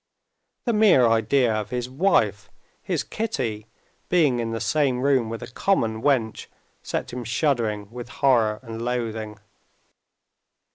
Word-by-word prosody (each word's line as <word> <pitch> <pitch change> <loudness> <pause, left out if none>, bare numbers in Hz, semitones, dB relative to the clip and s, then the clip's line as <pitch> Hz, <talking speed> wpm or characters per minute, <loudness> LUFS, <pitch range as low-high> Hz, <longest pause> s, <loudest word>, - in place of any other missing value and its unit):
The 235 - +1
mere 210 - +5
idea 115 +2 +2
of 110 -1 -3
his 125 -1 -3
wife, 115 - +1 0.3
his - - -2
Kitty, 125 - -3 0.4
being 150 -9 +3
in 115 -1 -2
the 115 0 -3
same 135 -4 +1
room 130 -4 +2
with 115 0 -5
a 120 - -9
common 115 - 0
wench, 120 -6 0 0.3
set - - -4
him 125 0 -4
shuddering 115 -4 0
with 120 0 -8
horror 115 -6 +2
and 115 -1 -7
loathing. 115 -3 -3
120 Hz, 135 wpm, -24 LUFS, 110-135 Hz, 0.4 s, mere